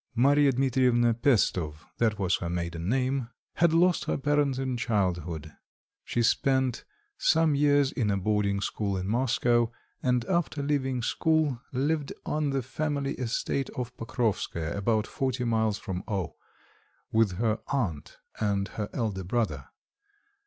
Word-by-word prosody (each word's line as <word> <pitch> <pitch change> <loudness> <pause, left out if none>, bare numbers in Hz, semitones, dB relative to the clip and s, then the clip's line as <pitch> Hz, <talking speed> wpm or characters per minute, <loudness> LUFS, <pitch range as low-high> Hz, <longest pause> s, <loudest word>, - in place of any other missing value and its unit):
Marya 140 +3 +5
Dmitrievna 125 -2 +3
Pesto 100 - +2 0.2
that 110 -3 +2
was 95 -2 +1
her 85 - -4
maiden 85 0 -3
name 130 0 0 0.3
had 170 -1 +4
lost 175 +2 +3
her - - 0
parents 145 -1 +1
in 130 -1 -1
childhood. 90 -9 -1 0.5
She 120 - 0
spent 130 +1 +2 0.4
some 160 -2 +3
years 145 -1 +3
in 115 -6 -1
a 100 - +1
boarding 100 0 0
school 100 -1 -2
in 95 0 -3
Moscow, 120 0 +2 0.3
and 125 -2 +1
after 170 -5 0
leaving 135 -4 0
school, 155 -3 +1
lived 145 +3 -1
on 150 -1 0
the 135 -2 -1
family 140 +1 -2
estate 125 +2 -2
of 125 0 -4
Pokrovskoe, 110 -9 -2
about 105 +2 +1
forty 130 0 -2
miles 110 -3 +1
from 95 -3 -5
O, 95 -6 -3 0.8
with 110 -4 +3
her 110 +3 0
aunt 95 - -2 0.2
and 100 -2 0
her 105 -2 -4
elder 105 -7 -2
brother. 115 +5 -1
120 Hz, 140 wpm, -28 LUFS, 100-135 Hz, 0.8 s, Marya